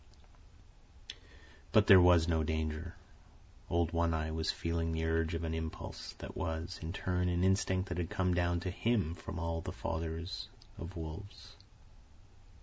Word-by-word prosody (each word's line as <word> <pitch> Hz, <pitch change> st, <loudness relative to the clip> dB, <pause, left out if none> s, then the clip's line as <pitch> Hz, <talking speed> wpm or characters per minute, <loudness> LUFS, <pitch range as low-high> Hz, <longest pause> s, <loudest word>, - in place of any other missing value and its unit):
But 110 Hz, -2 st, +6 dB
there 95 Hz, -4 st, +9 dB
was 90 Hz, -2 st, +6 dB
no 80 Hz, -2 st, +2 dB
danger. 80 Hz, +2 st, -2 dB, 0.7 s
Old 85 Hz, -1 st, +1 dB
One 85 Hz, -1 st, +2 dB
Eye 80 Hz, 0 st, -1 dB
was 80 Hz, 0 st, -1 dB
feeling 85 Hz, 0 st, -1 dB
the 80 Hz, 0 st, -1 dB
urge 80 Hz, 0 st, +1 dB
of 85 Hz, -, -3 dB
an 80 Hz, -1 st, -2 dB
impulse, 80 Hz, 0 st, -5 dB
that -, -, -8 dB
was, 80 Hz, +2 st, -3 dB
in 80 Hz, 0 st, -4 dB
turn, 90 Hz, -1 st, 0 dB
an 90 Hz, 0 st, +1 dB
instinct 95 Hz, 0 st, +2 dB
that 85 Hz, 0 st, -2 dB
had 85 Hz, -, -2 dB
come 95 Hz, -3 st, +1 dB
down 85 Hz, 0 st, +1 dB
to 90 Hz, -, -2 dB
him 100 Hz, -5 st, +1 dB
from 85 Hz, -, -7 dB
all 85 Hz, 0 st, -2 dB
the -, -, -5 dB
fathers 80 Hz, +3 st, -4 dB, 0.3 s
of 85 Hz, +2 st, -7 dB
wolves. 80 Hz, +5 st, -8 dB
85 Hz, 155 wpm, -34 LUFS, 80-90 Hz, 0.7 s, there